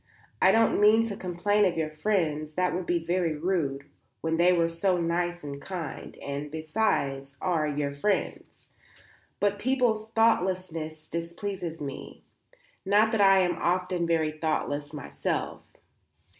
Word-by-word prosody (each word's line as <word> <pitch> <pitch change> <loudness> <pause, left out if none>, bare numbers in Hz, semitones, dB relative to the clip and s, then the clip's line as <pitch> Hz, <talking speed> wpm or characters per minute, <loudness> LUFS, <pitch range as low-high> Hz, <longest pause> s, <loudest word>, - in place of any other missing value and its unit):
I - - +7
don't 225 -2 +3
mean 215 +2 +6
to 200 - -4
complain 195 +2 +1
of 180 -4 +2
your 155 -1 -1
friends; 155 -4 -1
that 180 -2 +1
would 180 0 -3
be 170 -2 0
very 170 -2 0
rude 150 -5 -1 0.4
when 160 0 0
they 175 +2 +5
were 170 -2 +3
so 180 +3 +1
nice 175 0 -1
and 140 -1 -6
kind; 175 -7 -6
and, 140 +1 -5
besides, 145 -4 -1
are 165 -4 0
your 145 -1 -2
friends. 195 +9 -2 0.7
But 205 0 +1
people's 235 -3 +1
thoughtlessness 180 -8 0
displeases 170 +1 -5
me, 140 -2 -7 0.6
not 210 +3 +4
that 225 -3 +2
I 195 -1 +6
am 180 -1 +2
not 170 - -9
often 180 0 0
very 160 -2 +1
thoughtless 145 -2 -1
myself." 150 -3 -4
175 Hz, 145 wpm, -27 LUFS, 155-195 Hz, 0.7 s, I